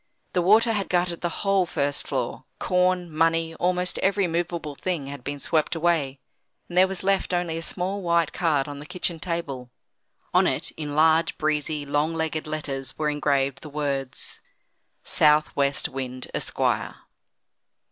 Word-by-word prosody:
The 180 - +2
water 220 +5 +5
had 200 -2 -1
gutted 175 -1 +1
the 175 - 0 0.2
whole 195 -2 +3
first 145 -3 -1
floor: - - -3
corn, 180 -2 +1
money, 165 0 +2
almost 180 0 0
every 195 0 +2
movable 170 -2 -2
thing 165 0 -3
had 140 -2 -8
been 145 +1 -4
swept 155 +2 +1
away, 160 -5 +1 0.5
and 175 - -9
there 185 +1 +6
was 190 -1 -3
left 195 -2 +1
only 175 -2 -1
a 165 - -3
small 185 +4 -1
white 170 -3 +2
card 155 -6 +1
on 145 -1 -7
the 150 - -10
kitchen 175 -2 -1
table. 150 -8 -4 0.6
On - - +5
it, - - -1
in 150 -2 -5
large, 160 +1 +4
breezy, 150 -1 -1
long 145 +3 0
legged 160 -1 -2
letters, 135 -4 -4
were 150 -1 +1
engraved 140 -2 0
the 155 - -9
words: 140 -3 -3 0.6
SOUTH 150 0 +4
WEST 140 0 +1
WIND, 130 -1 -5
ESQUIRE. - - 0
160 Hz, 155 wpm, -25 LUFS, 145-175 Hz, 0.6 s, there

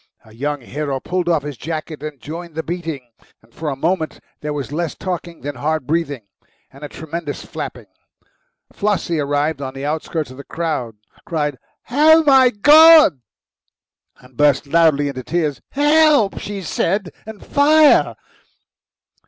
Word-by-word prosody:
A 110 - -17
young 145 +4 -3
hero 140 +2 -4
pulled 180 +4 -2
off 160 -4 +1
his 145 -3 -7
jacket 155 0 -6
and 150 -2 -7
joined 165 +4 -8
the 160 - -3
beating. 165 -7 -5 0.4
For 155 +5 -5
a 140 - -3
moment 160 +3 -2 0.2
there 150 - -4
was 145 -3 -5
less 165 +1 -3
talking 175 -2 -6
than 145 +1 -5
hard 150 +2 -2
breathing, 145 -6 -2 0.5
and 140 +2 -14
a 145 - -6
tremendous 160 -1 -6
flapping. - - -7 0.9
Flossie, 200 -5 -1
arriving 145 +1 -1
on 130 0 -6
the 135 +1 -5
outskirts 155 -1 -3
of 130 - -12
the 140 - -9
crowd, 150 -10 -4 0.3
cried, 150 -6 -3 0.3
"Oh, 315 +4 +5
my 265 -3 +6
God!" 300 - +7 1.0
and 125 0 -20
burst 145 +1 +2
loudly 150 -1 +3
into 135 -2 -5
tears. 155 0 -2
"Help!" 295 -6 +3
she 200 -2 -6
said, 185 +3 -1 0.2
and 220 -2 -10
"Fire!" 300 +1 +4
160 Hz, 145 wpm, -19 LUFS, 145-185 Hz, 1.0 s, God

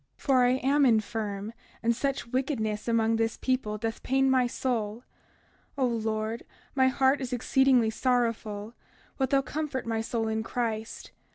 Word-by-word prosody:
For 260 -3 +3
I 245 0 +4
am 275 +3 +2
infirm, 215 -3 0 0.3
and 235 +1 +2
such 275 +2 -2
wickedness 235 -4 -2
among 225 -1 +2
this 225 0 0
people 250 -5 -1
doth 225 +1 -4
pain 270 +1 +2
my 255 -2 +3
soul. 235 -2 -2 0.7
31:31 270 - +1
O - - +5
Lord, 220 -1 -2 0.3
my 260 -1 +4
heart 265 +1 +2
is 260 -1 -4
exceedingly 250 -1 +3
sorrowful; 230 -3 -1 0.5
wilt 265 -1 +1
thou 275 0 +3
comfort 290 -3 -3
my 225 -1 -1
soul 225 0 -2
in 220 0 -1
Christ. 225 -1 -4
235 Hz, 155 wpm, -28 LUFS, 220-260 Hz, 0.7 s, O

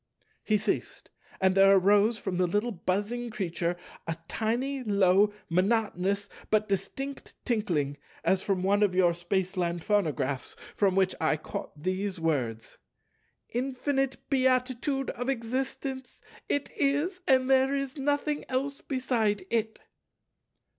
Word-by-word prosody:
He 215 - +2
ceased; 215 - -3 0.3
and 190 0 +3
there 195 +1 +7
arose 205 +4 +4
from 190 -3 -3
the 180 0 +2
little 210 +7 0
buzzing 205 +6 -2
creature 175 -4 -2 0.3
a 165 -1 -2
tiny, 255 +5 -1
low, 200 -1 +4 0.2
monotonous, 200 +1 +1 0.2
but 215 0 +2
distinct 270 +8 -4
tinkling, 170 - 0 0.3
as 190 0 +3
from 190 -2 -1
one 200 +2 +3
of 200 -3 +3
your 180 -2 +4
Spaceland 175 -1 -1
phonographs, 150 -10 0 0.2
from 195 -3 +2
which 190 -1 +3
I 155 -1 +2
caught 150 0 -7
these 185 +1 -2
words, 125 -9 -2 0.7
"Infinite 270 +2 -1
beatitude 260 +1 +1
of 245 +2 -4
existence! 260 +2 -3 0.3
It 285 0 0
is; 295 +7 0
and 260 -1 +4
there 265 +1 +4
is 275 -1 -3
nothing 290 +1 0
else 275 +2 -2
beside 230 -7 0
It." 225 -1 -1
210 Hz, 125 wpm, -28 LUFS, 185-260 Hz, 0.7 s, there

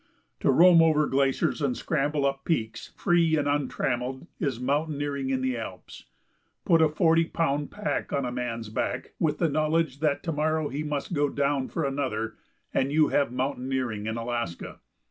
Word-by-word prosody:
To - - +1
roam 170 +5 +7
over 155 -2 +4
glaciers 135 +2 +1
and 135 -4 0
scramble 145 -1 0
up 135 0 -1
peaks 115 -9 -2
free 165 -2 +3
and 145 -1 0
untrammelled 130 -2 -1
is 135 -8 -1
mountaineering 140 0 -1
in 130 -1 0
the 130 -1 0
Alps. 95 -5 -9 0.6
Put 165 -1 +4
a 160 - +5
forty 165 +1 +3
pound 145 -3 -1
pack 210 0 -3
on 140 -2 0
a 125 - -3
man's 115 -3 -4
back, 125 +3 -3
with 155 -2 +1
the 170 - +2
knowledge 155 -1 0
that 150 -2 0
to 165 - -2
morrow 155 0 0
he 140 +3 -3
must 150 +2 -3
go 145 -2 +2
down 140 -1 0
for 165 - -2
another, 130 -5 -2 0.4
and 135 +1 +1
you 155 0 +4
have 140 -4 +1
mountaineering 130 -4 -2
in 110 +1 -2
Alaska. 115 -6 -4
140 Hz, 170 wpm, -27 LUFS, 130-155 Hz, 0.6 s, roam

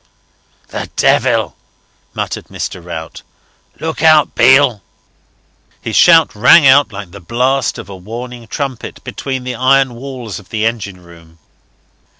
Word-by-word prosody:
"The - - -6
devil!" - - +1 0.6
muttered - - -4
Mr. 90 - -6
Rout. 80 -2 -8 0.6
"Look 160 0 -4
out, 155 -2 +4
Beale!" 130 -2 +4 1.0
His 115 - -5
shout 165 -2 +5
rang 140 +9 +6
out 135 -1 +5
like 100 -3 -9
the 100 - -11
blast 125 +7 -1
of - - -9
a 100 - -9
warning 115 +5 -9
trumpet, 135 +1 -6
between 130 -2 -5
the 125 0 -4
iron 130 +1 +2
walls 125 -4 -7
of 100 - -18
the 110 -1 -2
engine 100 -5 -4
room. 85 -1 -18
120 Hz, 135 wpm, -15 LUFS, 100-135 Hz, 1.0 s, rang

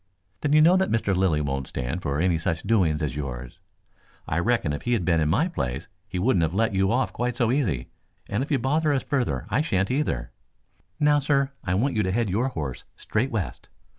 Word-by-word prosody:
"Then 145 - 0
you 155 - +7
know 175 +4 +6
that 190 0 +1
Mr. 105 -4 +1
Lilly 90 -5 +2
won't 70 -2 -2
stand 65 +9 -3
for 70 -2 -1
any 85 -1 +2
such 80 -1 -2
doings 85 -9 +2
as 70 -4 -2
yours. 65 -4 -6 0.7
I 80 - 0
reckon 110 -7 +1
if 75 - -4
he 120 - 0
had 105 -8 0
been 85 -2 +3
in 75 -1 +1
my 120 - +2
place 70 - -3 0.2
he 95 - -5
wouldn't 95 -1 +2
have 80 +2 0
let 115 +1 +2
you 95 0 +2
off 125 +3 +1
quite 120 0 -1
so 120 -3 +2
easy, 95 - 0 0.4
and 105 - -1
if 140 - -3
you 145 - +2
bother 150 +5 +1
us 135 - 0
further 120 - -1
I 140 - +3
shan't, 100 - 0
either. 145 +4 -1 0.7
Now, 150 0 +4
sir, 140 -1 +1
I 90 - 0
want 125 +6 +1
you 110 - +2
to 95 -2 0
head 110 -1 0
your 115 +7 +1
horse 75 - -5
straight 120 +5 -1
west. 110 -8 -4
100 Hz, 225 wpm, -25 LUFS, 80-130 Hz, 0.7 s, you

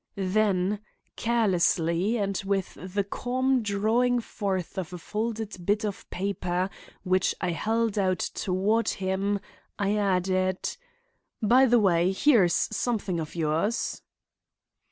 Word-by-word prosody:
Then, 195 0 +1 0.4
carelessly 190 -3 +2
and 200 -2 -1
with 195 -1 -1
the 190 +3 -3
calm 255 +5 0
drawing 220 +4 +2
forth 195 -5 -3
of 180 -3 -5
a 180 - -6
folded 215 +1 -4
bit 205 +4 +1
of 205 -2 -5
paper 185 -1 -2 0.3
which 185 0 +2
I 180 - -1
held 220 +5 0
out 185 -2 +2
toward 200 +6 0
him, 195 +1 -1 0.4
I 200 +1 +1
added: 185 -2 0 0.6
"By 250 +5 +5
the 240 0 +5
way, 180 -5 +3
here 230 -2 +5
is 175 - +1 0.2
something 215 -6 -1
of 155 0 -6
yours." 165 +7 -1
200 Hz, 120 wpm, -27 LUFS, 185-220 Hz, 0.6 s, By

